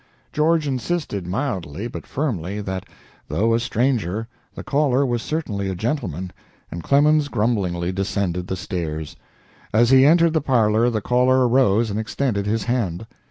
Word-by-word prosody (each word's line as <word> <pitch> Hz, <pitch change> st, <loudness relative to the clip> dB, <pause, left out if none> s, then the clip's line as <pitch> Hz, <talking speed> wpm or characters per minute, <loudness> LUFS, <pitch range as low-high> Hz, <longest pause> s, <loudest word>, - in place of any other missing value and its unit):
George 155 Hz, 0 st, +2 dB
insisted 130 Hz, -, -2 dB
mildly, 95 Hz, -, -3 dB
but -, -, -8 dB
firmly, 105 Hz, -, -3 dB
that, 95 Hz, -2 st, -5 dB, 0.4 s
though 105 Hz, +10 st, +1 dB
a 115 Hz, -, +3 dB
stranger, 115 Hz, -4 st, -1 dB, 0.3 s
the -, -, -7 dB
caller 140 Hz, -2 st, +2 dB
was 120 Hz, -3 st, -1 dB
certainly 105 Hz, -12 st, -3 dB
a 95 Hz, -, -3 dB
gentleman, 95 Hz, -, -3 dB, 0.4 s
and 85 Hz, -, -5 dB
Clemens 145 Hz, -, +3 dB
grumblingly 100 Hz, -8 st, -1 dB
descended 95 Hz, -2 st, -2 dB
the 95 Hz, -, -2 dB
stairs. 85 Hz, -5 st, -4 dB, 0.6 s
As 120 Hz, +3 st, +3 dB
he 130 Hz, 0 st, +7 dB
entered 165 Hz, +2 st, +5 dB
the 160 Hz, -, +2 dB
parlor 115 Hz, -3 st, +2 dB
the 110 Hz, -3 st, -2 dB
caller 125 Hz, +2 st, +3 dB
arose 115 Hz, -3 st, +3 dB
and 105 Hz, -, -2 dB
extended 110 Hz, -2 st, -2 dB
his 110 Hz, +2 st, 0 dB
hand. 115 Hz, -6 st, -2 dB
115 Hz, 150 wpm, -22 LUFS, 95-135 Hz, 0.6 s, he